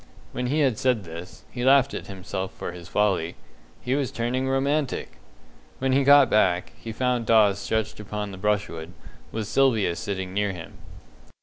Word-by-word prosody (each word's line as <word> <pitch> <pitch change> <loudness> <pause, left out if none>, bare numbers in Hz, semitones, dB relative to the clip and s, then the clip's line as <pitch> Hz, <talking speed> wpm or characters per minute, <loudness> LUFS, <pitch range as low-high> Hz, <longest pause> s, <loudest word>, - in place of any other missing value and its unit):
When 125 - -3
he 150 +4 +1
had 130 -6 +2
said 125 -5 +1
this, 85 +1 -10
he 120 - -4
laughed 135 +1 +5
at - - -6
himself 95 -1 -5
for - - -6
his 85 -1 -10
folly 95 -5 0 0.5
he 125 - -1
was 140 -2 0
turning 125 +3 -1
romantic! 140 +1 -1 0.6
When 130 0 0
he 135 +1 +3
got 140 0 +7
back, 90 -5 +2
he 115 - -8
found 125 0 -1
Dawes 105 -3 +5
stretched 110 0 -2
upon 105 0 -5
the 95 - -8
brushwood, 95 -5 -2 0.4
with 110 -1 -3
Sylvia 110 -9 +2
sitting 95 -2 -4
near 100 0 0
him. 85 -2 -10
110 Hz, 170 wpm, -25 LUFS, 95-130 Hz, 0.6 s, got